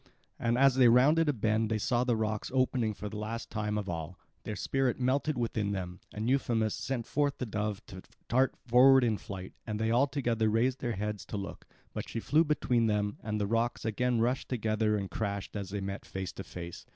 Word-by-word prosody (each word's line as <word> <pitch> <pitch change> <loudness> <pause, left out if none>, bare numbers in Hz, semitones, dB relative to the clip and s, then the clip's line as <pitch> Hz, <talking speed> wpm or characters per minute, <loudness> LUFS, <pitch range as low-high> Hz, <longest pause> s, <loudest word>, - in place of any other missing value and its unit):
And 120 +1 +1
as 135 0 +6
they 130 -1 +6
rounded 145 +7 +5
a - - +3
bend 110 -1 +1
they 110 - +1
saw 120 +4 +1
the 125 -2 +1
rocks 110 -1 -2
opening 125 -4 +1
for 105 - -6
the 105 +1 -6
last 115 +2 -5
time 105 -1 -1
of 105 -2 -3
all. 85 0 -5 0.3
Their 105 - -3
spirit 130 +5 0
melted 135 +3 +1
within 110 -4 -1
them; 90 -2 -5
and 110 +2 -3
Euphemus 115 -5 +1
sent 125 -4 -3
forth 145 +1 0
the 125 - -3
dove 105 -2 -3
to 95 -2 -10 0.3
dart 130 +2 +2
forward 130 +2 +7
in 110 -4 +1
flight; 95 -2 -8
and 105 -1 -3
they 110 0 +1
all 125 +4 +4
together 120 -5 0
raised 120 +4 +1
their 120 -2 -2
heads 105 0 -3
to 105 - -4
look; 100 0 -7 0.3
but - - -5
she - - -3
flew 155 +8 +3
between 125 -6 +1
them, 105 -1 0
and 105 0 -2
the 105 - +1
rocks 115 +3 0
again 120 +2 +1
rushed 125 +3 0
together 110 -3 +1
and 100 -2 -4
crashed 100 -2 -3
as 100 -3 -4
they 100 0 -3
met 100 +1 -4
face 95 -1 -4
to 95 - -7
face. 85 -2 -8
110 Hz, 215 wpm, -30 LUFS, 105-125 Hz, 0.3 s, forward